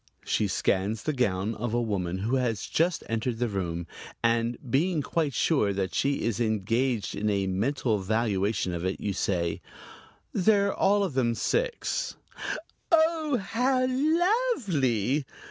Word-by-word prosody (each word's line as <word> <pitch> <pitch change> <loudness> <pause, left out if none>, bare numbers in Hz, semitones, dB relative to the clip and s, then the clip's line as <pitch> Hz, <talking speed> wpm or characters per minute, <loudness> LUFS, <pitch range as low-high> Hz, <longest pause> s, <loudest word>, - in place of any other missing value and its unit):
She 105 - +1
scans 100 +3 0
the 155 - 0
gown 105 -5 0
of 115 +1 -3
a - - +2
woman 95 -6 -1
who 115 +7 0
has 115 -5 -1
just 170 +1 +1
entered 115 +1 -1
the 120 +1 0
room 85 -5 -3 0.4
and, 115 +1 +2
being 155 +5 +1
quite 150 -5 -1
sure 110 -11 +2
that 95 -1 -2
she 140 0 0
is 115 -2 -1
engaged 115 +1 0
in 105 +1 0
a 100 -1 +1
mental 110 +3 0
valuation 100 -2 0
of 85 0 -3
it, 95 +1 -2
you 100 - -2
say: 85 -3 -1 0.7
"They're 200 +1 +3
all 200 +1 +3
of 185 -7 -2
them 120 -3 +1
six." - - -1 0.8
"Oh, 320 -4 +3
how 250 +6 +1
lovely!" 255 - +1
120 Hz, 145 wpm, -27 LUFS, -, 0.8 s, They're